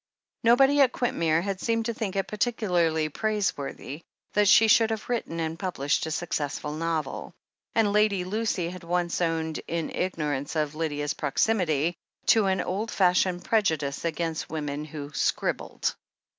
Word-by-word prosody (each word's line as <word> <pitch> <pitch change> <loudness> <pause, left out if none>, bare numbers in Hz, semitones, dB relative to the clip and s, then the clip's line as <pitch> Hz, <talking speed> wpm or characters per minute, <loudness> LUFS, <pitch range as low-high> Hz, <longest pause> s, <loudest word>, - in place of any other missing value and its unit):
Nobody 270 +5 +5
at 255 -3 +4
Quintmere 165 -9 +1
had 195 -1 -3
seemed 230 -1 0
to 235 - -1
think 210 -4 -4
it 195 - 0
par 210 - -7
ticularly 170 - +1
praiseworthy 190 - -2 0.3
that 210 0 +3
she 225 +3 +7
should 225 +1 +5
have 220 -1 -3
written 225 -9 -2
and 165 0 -3
published 160 -6 -1
a - - -4
successful 150 -3 -2
novel, 160 0 -3 0.4
and 215 -3 +3
Lady 210 -3 +3
Lucy 190 -3 -1
had 180 -1 -9
once 175 0 -1
owned, 160 -2 -1
in 165 -1 -2
ignorance 150 -6 -2
of 150 -1 0
Lydia's 145 -2 -2
proximity, 160 0 +1 0.3
to 220 -3 +5
an 190 -1 +1
old 205 +6 -2
fashioned 180 -2 +2
prejudice 160 -11 +1
against 165 -1 -2
women 150 -1 -3
who 145 -1 -7
"scribbled." - - -1
175 Hz, 150 wpm, -27 LUFS, 155-210 Hz, 0.4 s, she